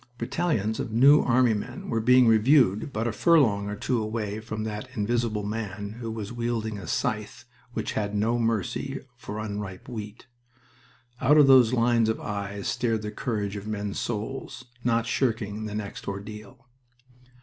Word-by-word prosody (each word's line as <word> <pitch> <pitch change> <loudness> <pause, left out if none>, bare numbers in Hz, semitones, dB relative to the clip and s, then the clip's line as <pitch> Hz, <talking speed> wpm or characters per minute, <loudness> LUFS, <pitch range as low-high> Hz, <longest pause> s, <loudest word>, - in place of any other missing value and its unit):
Battalions 115 - -1
of 120 - -3
New 140 +6 +6
Army 125 -1 +3
men 120 +4 -5
were 115 -1 0
being 125 +2 +6
reviewed 115 +1 +4
but 115 0 -1
a - - 0
furlong 110 - +3
or 105 - -3
two 120 +3 -1
away 110 -1 -3
from 110 -1 -5
that 105 -1 -5
Invisible 110 0 0
Man 105 0 -5
who 115 -2 -4
was 110 -1 -5
wielding 115 -3 -2
a 90 - -9
scythe - - -2 0.3
which - - -3
had 105 -1 -2
no 115 +3 +1
mercy 115 +4 -1 0.2
for 105 -3 -7
unripe 105 -3 -5
wheat. 110 -3 -7 1.0
Out 150 +3 +5
of 150 - +8
those 130 -4 +7
lines 115 -2 +3
of 110 - -1
eyes 100 -1 -4
stared 115 -3 0
the 105 - -4
courage 105 -4 -3
of 100 +1 -6
men's 105 -2 -3
souls, 120 +4 -4 0.2
not 115 -1 +2
shirking 110 -4 -1
the 105 -1 -5
next 105 -1 -6
ordeal. 105 +5 -8
110 Hz, 160 wpm, -26 LUFS, 105-120 Hz, 1.0 s, of